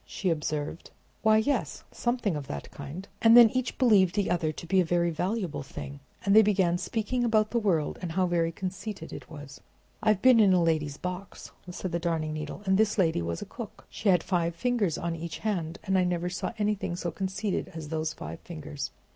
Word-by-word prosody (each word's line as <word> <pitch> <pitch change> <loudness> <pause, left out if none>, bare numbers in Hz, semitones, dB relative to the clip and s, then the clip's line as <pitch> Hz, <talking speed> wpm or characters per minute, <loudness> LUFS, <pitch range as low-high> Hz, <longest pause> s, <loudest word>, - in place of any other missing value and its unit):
she 185 -4 -2
observed. 155 0 -3 0.3
"Why, 220 0 +5
yes, 220 - 0
something 240 -7 -1
of 145 -2 -5
that 70 - -6
kind." 150 +8 -8
And 230 +1 +8
then 235 -3 +9
each 255 -1 -2
believed 205 -8 +4
the 205 -2 +1
other 165 -3 +1
to 155 - -9
be 190 +2 +3
a - - +3
very 170 0 +1
valuable 180 0 -2
thing; 140 +1 -8 0.3
and 200 +1 +4
they 220 - +10
began 190 -4 +2
speaking 235 +5 -1
about 215 -2 +2
the 235 - +2
world, 175 -9 0
and 170 -3 -4
how 185 +1 +2
very 170 -2 +1
conceited 185 0 -6
it - - -9
was. 145 -3 -10 0.4
"I 225 - -4
have 210 -3 +4
been 255 -3 +7
in 200 -3 +6
a 180 -2 +4
lady's 155 -3 0
box," 180 +1 -6 0.2
said 180 0 -5
the 170 - -1
Darning 165 -2 -1
Needle, 155 +6 -6
"and 190 +1 +3
this 220 0 +2
lady 165 - +2
was 85 0 -3
a - - -8
cook. - - -9
She 215 - -1
had 180 -3 +4
five 170 -3 0
fingers 220 -4 0
on 170 0 -2
each 165 0 -6
hand, 175 -6 -2
and 190 - 0
I 185 - +4
never 180 0 -1
saw 180 - -3
anything 210 -4 -1
so 175 -1 -3
conceited 190 +3 -2
as 155 -2 -6
those 160 0 -1
five 80 - -8
fingers. 150 -4 -6
180 Hz, 215 wpm, -28 LUFS, 160-210 Hz, 0.4 s, they